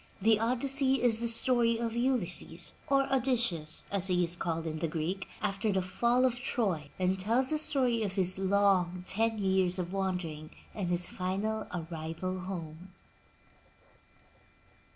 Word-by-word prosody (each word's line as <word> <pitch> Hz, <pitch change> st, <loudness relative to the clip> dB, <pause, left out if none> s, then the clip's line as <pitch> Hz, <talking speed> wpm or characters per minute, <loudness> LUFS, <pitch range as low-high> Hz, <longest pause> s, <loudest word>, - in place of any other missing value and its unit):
The 215 Hz, +2 st, +4 dB
Odyssey 265 Hz, +3 st, +2 dB
is 225 Hz, -2 st, +4 dB
the 235 Hz, -, +1 dB
story 230 Hz, 0 st, +2 dB
of 230 Hz, -1 st, -2 dB
Ulysses, 235 Hz, -9 st, -1 dB
or 275 Hz, 0 st, +3 dB
Odysseus 235 Hz, -, 0 dB
as 195 Hz, -2 st, 0 dB
he 180 Hz, -1 st, +2 dB
is 170 Hz, 0 st, -1 dB
called 165 Hz, -1 st, -2 dB
in 155 Hz, -1 st, -3 dB
the 165 Hz, -, 0 dB
Greek, 165 Hz, +5 st, -3 dB, 0.2 s
after 200 Hz, +2 st, 0 dB
the 190 Hz, -1 st, 0 dB
fall 240 Hz, +7 st, +2 dB
of 245 Hz, -1 st, 0 dB
Troy 190 Hz, -, -1 dB
and 185 Hz, +1 st, 0 dB
tells 235 Hz, +8 st, +2 dB
the 310 Hz, -, +2 dB
story 255 Hz, -6 st, +2 dB
of 200 Hz, -3 st, -2 dB
his 185 Hz, -1 st, +1 dB
long 190 Hz, -2 st, +2 dB
ten 225 Hz, +3 st, +1 dB
years 190 Hz, -2 st, +2 dB
of 180 Hz, 0 st, -4 dB
wandering 180 Hz, -6 st, -3 dB, 0.2 s
and 200 Hz, -4 st, -3 dB
his 175 Hz, 0 st, +3 dB
final 200 Hz, +4 st, -2 dB
arrival 165 Hz, +2 st, -4 dB
home. 180 Hz, -1 st, -7 dB
195 Hz, 150 wpm, -31 LUFS, 175-230 Hz, 0.2 s, The